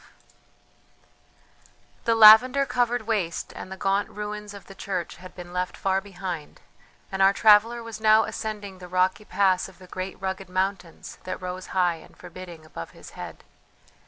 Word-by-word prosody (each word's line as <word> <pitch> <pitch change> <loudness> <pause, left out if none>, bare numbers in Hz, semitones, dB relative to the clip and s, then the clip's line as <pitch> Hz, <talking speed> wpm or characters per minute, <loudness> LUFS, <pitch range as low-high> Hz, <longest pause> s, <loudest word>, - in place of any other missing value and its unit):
XII - - -33 1.0
The 230 - +3
lavender 235 +5 +8
covered 245 -2 0
waste 205 -7 -2
and 185 - -8
the 190 - -6
gaunt 195 +2 0
ruins 210 0 -6
of 200 - -11
the 195 - -12
church 190 -2 -4
had 185 +1 -12
been 175 0 -10
left 180 0 -2
far 195 0 0
behind, 180 -5 -7 0.5
and 195 0 -2
our 195 +1 +6
traveller 225 +3 +5
was 225 -1 -8
now 220 0 +6
ascending 205 -3 -5
the 180 - -9
rocky 185 +3 +1
pass 190 -3 +1
of - - -18
the 185 - -14
great 185 +1 -6
rugged 190 -1 -4
mountains 185 -2 -3
that 185 - -4
rose 185 0 -6
high 175 -2 +3
and - - -17
forbidding 175 -4 -11
above 85 - -8
his - - -12
head. - - -9
195 Hz, 165 wpm, -25 LUFS, 180-210 Hz, 1.0 s, lavender